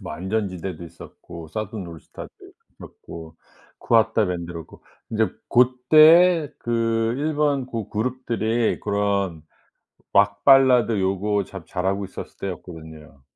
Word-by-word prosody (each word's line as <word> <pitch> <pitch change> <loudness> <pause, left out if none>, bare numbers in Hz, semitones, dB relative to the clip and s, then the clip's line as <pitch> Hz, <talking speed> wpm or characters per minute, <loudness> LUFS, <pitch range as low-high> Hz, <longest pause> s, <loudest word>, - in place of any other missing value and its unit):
뭐 - - -7
안전지대도 95 -2 -4
있었고 85 0 -12
Southern 105 0 -5
All 85 -1 -10
Stars도 - - -13 0.3
있었고 80 -1 -12 0.4
KUWATA 110 -2 +2
BAND도 85 -1 -4
그렇고 85 -2 -11 0.3
이제 110 -1 +1 0.2
고때에 155 +7 +5
그 115 -1 -1
일본 145 -3 0
고 115 -5 -5 0.2
룹들이 120 -2 -1
그런 100 -5 -1 0.7
락 100 0 +2
발라드 130 -5 +5
요거 100 +2 0
참 95 -2 -10
잘하고 95 +2 -2
있었을 95 - -10
때였거든요. 80 -5 -9
105 Hz, 335 characters per minute, -22 LUFS, 90-120 Hz, 0.7 s, 고때에